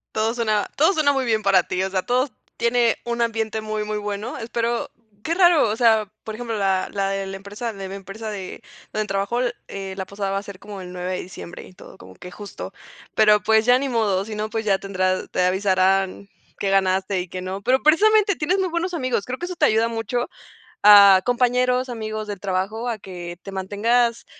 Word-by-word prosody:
Todo 220 Hz, +1 st, +1 dB
suena 215 Hz, -4 st, 0 dB
todo 315 Hz, +6 st, +4 dB
suena, 300 Hz, -4 st, +3 dB
muy 270 Hz, -1 st, 0 dB
bien 220 Hz, -2 st, +1 dB
para 195 Hz, -3 st, +4 dB
ti, 180 Hz, -, -2 dB
o 190 Hz, -, -1 dB
sea, 190 Hz, -1 st, 0 dB
todo 255 Hz, +3 st, +1 dB, 0.3 s
tiene 235 Hz, -1 st, +2 dB
un 235 Hz, 0 st, -2 dB
ambiente 220 Hz, -1 st, -1 dB
muy, 215 Hz, 0 st, -3 dB
muy 215 Hz, 0 st, -3 dB
bueno, 210 Hz, +3 st, -4 dB
espero. 235 Hz, +1 st, -2 dB, 0.3 s
Qué 335 Hz, +2 st, -1 dB
raro, 345 Hz, -, +5 dB
o 210 Hz, -, -1 dB
sea, 220 Hz, -3 st, +3 dB
por 220 Hz, -, -6 dB
ejemplo, 230 Hz, -1 st, -4 dB
la 195 Hz, -2 st, 0 dB
la 195 Hz, -1 st, -1 dB
de 195 Hz, 0 st, -3 dB
la 195 Hz, 0 st, -6 dB
empresa 205 Hz, +4 st, -6 dB
la 210 Hz, -, -13 dB
de 190 Hz, -, -4 dB
mi 195 Hz, -, -6 dB
empresa 200 Hz, +3 st, -7 dB
de 195 Hz, +1 st, -7 dB, 0.3 s
donde 215 Hz, 0 st, -1 dB
trabajo, 200 Hz, +4 st, -1 dB, 0.3 s
eh, 195 Hz, -1 st, -6 dB
la 190 Hz, -1 st, -4 dB
pasada 200 Hz, 0 st, -4 dB
va 195 Hz, -, 0 dB
a -, -, -10 dB
ser 200 Hz, -2 st, -10 dB
como 200 Hz, 0 st, -9 dB
el 180 Hz, -1 st, -9 dB
9 180 Hz, 0 st, -4 dB
de 185 Hz, -, -2 dB
diciembre, 175 Hz, -1 st, -9 dB
y -, -, -15 dB
todo, -, -, -14 dB
como 95 Hz, 0 st, -13 dB
que 180 Hz, -, -11 dB
justo. 205 Hz, +2 st, -8 dB, 0.4 s
Pero, 210 Hz, -1 st, +5 dB
pues, 220 Hz, +1 st, +3 dB
ya 245 Hz, +1 st, +6 dB
ni 275 Hz, +1 st, -2 dB
modo, 210 Hz, -6 st, 0 dB
si 220 Hz, -, -7 dB
no, 215 Hz, +1 st, -3 dB
pues, 225 Hz, 0 st, -3 dB
ya 195 Hz, -2 st, +2 dB
tendrás, 185 Hz, -1 st, -1 dB
te 180 Hz, -, +1 dB
avisarán 190 Hz, +1 st, +1 dB, 0.3 s
qué 195 Hz, -, 0 dB
ganaste 190 Hz, 0 st, +1 dB
y 180 Hz, -, -7 dB
qué 185 Hz, +1 st, -6 dB
no. 190 Hz, +2 st, -5 dB
Pero, 255 Hz, +5 st, +2 dB
precisamente, 405 Hz, +5 st, +4 dB
tienes 315 Hz, +6 st, 0 dB
muy 380 Hz, -1 st, 0 dB
buenos 340 Hz, +2 st, -2 dB
amigos, 255 Hz, -9 st, -1 dB
creo 255 Hz, +1 st, -4 dB
que 350 Hz, -, -4 dB
eso 360 Hz, 0 st, -5 dB
te -, -, +3 dB
ayuda 220 Hz, +1 st, +3 dB
mucho, 230 Hz, +2 st, -2 dB, 0.6 s
a 200 Hz, -2 st, +9 dB
compañeros, 250 Hz, +1 st, +2 dB
amigos 215 Hz, -2 st, -5 dB
del 205 Hz, -2 st, -5 dB
trabajo, 200 Hz, +5 st, -2 dB
a 230 Hz, -3 st, -2 dB
que 175 Hz, -3 st, -8 dB
te -, -, -8 dB
mantengas 230 Hz, +5 st, 0 dB
215 Hz, 220 wpm, -22 LUFS, 195-240 Hz, 0.6 s, a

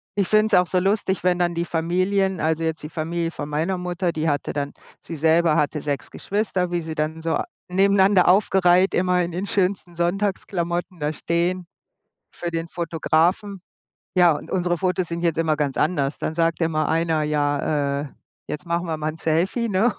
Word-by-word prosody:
Ich 200 Hz, -3 st, +1 dB
finde 215 Hz, 0 st, +4 dB
es 220 Hz, -, -5 dB
auch 180 Hz, -, +1 dB
so 185 Hz, -, +1 dB
lustig, 195 Hz, 0 st, 0 dB
wenn 180 Hz, -1 st, +2 dB
dann 175 Hz, -1 st, +1 dB
die 170 Hz, 0 st, -1 dB
Familien 185 Hz, +3 st, 0 dB
also 160 Hz, +1 st, 0 dB
jetzt 160 Hz, 0 st, -2 dB
die 150 Hz, -, -6 dB
Familie 165 Hz, +1 st, -2 dB
von 145 Hz, -3 st, -6 dB
meiner 160 Hz, +6 st, -1 dB
Mutter, 180 Hz, 0 st, -2 dB
die 160 Hz, 0 st, -2 dB
hatte 145 Hz, -2 st, -1 dB
dann 145 Hz, -1 st, -3 dB, 0.3 s
sie 165 Hz, -, -7 dB
selber 160 Hz, +1 st, +3 dB
hatte 150 Hz, 0 st, 0 dB
6 145 Hz, -1 st, -3 dB
Geschwister, 190 Hz, -3 st, -2 dB
wie 175 Hz, -1 st, 0 dB
sie 160 Hz, -1 st, -6 dB
dann 155 Hz, +1 st, -2 dB
so 165 Hz, 0 st, -1 dB
a -, -, -1 dB, 0.2 s
nebeneinander 195 Hz, 0 st, +4 dB
aufgereiht, 185 Hz, -1 st, +4 dB
immer 180 Hz, 0 st, +2 dB
in 175 Hz, 0 st, -2 dB
in 185 Hz, +3 st, -3 dB
schönsten 185 Hz, -3 st, -1 dB
Sonntagsklamotten 175 Hz, -1 st, -2 dB
da 150 Hz, +1 st, -1 dB
stehen 170 Hz, +3 st, -1 dB, 0.7 s
für 175 Hz, -, -4 dB
den 165 Hz, 0 st, -3 dB
Fotografen. 170 Hz, +4 st, 0 dB, 0.6 s
Ja, 175 Hz, -2 st, +6 dB
und 150 Hz, -, -6 dB
unsere 175 Hz, -2 st, 0 dB
Fotos 185 Hz, -1 st, 0 dB
sind 170 Hz, 0 st, -4 dB
jetzt 170 Hz, -2 st, 0 dB
immer 160 Hz, -1 st, +1 dB
ganz 145 Hz, -3 st, -1 dB
anders. 145 Hz, -4 st, 0 dB
Dann 155 Hz, -, -3 dB
sagt 165 Hz, +1 st, +1 dB
immer 155 Hz, -1 st, +1 dB
einer: 160 Hz, -1 st, +1 dB
„Ja, 145 Hz, -1 st, 0 dB
äh, -, -, -8 dB, 0.4 s
jetzt 150 Hz, -, -5 dB
machen 170 Hz, +1 st, -1 dB
wir 160 Hz, -1 st, -2 dB
mal 155 Hz, 0 st, -2 dB
‘n 155 Hz, -, -11 dB
Selfie, 180 Hz, +10 st, 0 dB
ne? 215 Hz, +4 st, +2 dB
170 Hz, 190 wpm, -23 LUFS, 160-185 Hz, 0.7 s, Ja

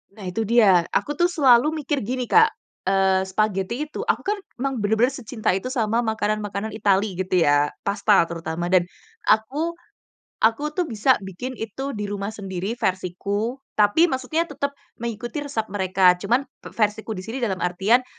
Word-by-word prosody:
Nah 210 Hz, -3 st, -10 dB
itu 185 Hz, +5 st, -2 dB
dia, 200 Hz, -6 st, +5 dB
aku 295 Hz, -, -1 dB
tuh 345 Hz, +4 st, +2 dB
selalu 275 Hz, -6 st, +5 dB, 0.2 s
mikir 285 Hz, 0 st, 0 dB
gini 250 Hz, +4 st, -2 dB
Kak, 445 Hz, -, +5 dB, 0.4 s
eee, 190 Hz, -1 st, +3 dB
spaghetti 215 Hz, +6 st, -1 dB
itu 305 Hz, -, -6 dB
aku 460 Hz, 0 st, 0 dB
kan 415 Hz, +1 st, 0 dB, 0.2 s
emang 265 Hz, -2 st, -2 dB
bener-bener 220 Hz, +6 st, +2 dB
secinta 225 Hz, -6 st, -2 dB
itu 195 Hz, +7 st, -2 dB
sama 230 Hz, -3 st, +1 dB
makanan-makanan 215 Hz, -2 st, -2 dB
Itali 200 Hz, -2 st, +1 dB
gitu 185 Hz, 0 st, -1 dB
ya, 145 Hz, 0 st, +3 dB, 0.2 s
pasta 200 Hz, -2 st, +3 dB
terutama. 165 Hz, 0 st, -4 dB
Dan 180 Hz, -1 st, +3 dB, 0.4 s
aku, 290 Hz, +11 st, +1 dB, 0.7 s
aku 225 Hz, +5 st, +3 dB
tuh 360 Hz, -, +2 dB
bisa 250 Hz, -1 st, +2 dB
bikin 245 Hz, +8 st, -6 dB
itu 265 Hz, +4 st, -5 dB
di 210 Hz, -, -3 dB
rumah 200 Hz, -1 st, -3 dB
sendiri 195 Hz, 0 st, -4 dB
versiku, 200 Hz, +4 st, -2 dB, 0.2 s
tapi 210 Hz, +10 st, +4 dB
maksudnya 260 Hz, +6 st, 0 dB
tetap 280 Hz, -4 st, -4 dB, 0.2 s
mengikuti 235 Hz, +4 st, -4 dB
resep 280 Hz, -7 st, -3 dB
mereka, 190 Hz, -2 st, +4 dB
cuman 245 Hz, +7 st, +1 dB, 0.2 s
te -, -, -10 dB
versiku 220 Hz, 0 st, -1 dB
di 185 Hz, -, -7 dB
sini 230 Hz, +6 st, -5 dB
dalam 210 Hz, -6 st, 0 dB
artian, 195 Hz, +8 st, +2 dB
220 Hz, 160 wpm, -23 LUFS, 195-255 Hz, 0.7 s, dia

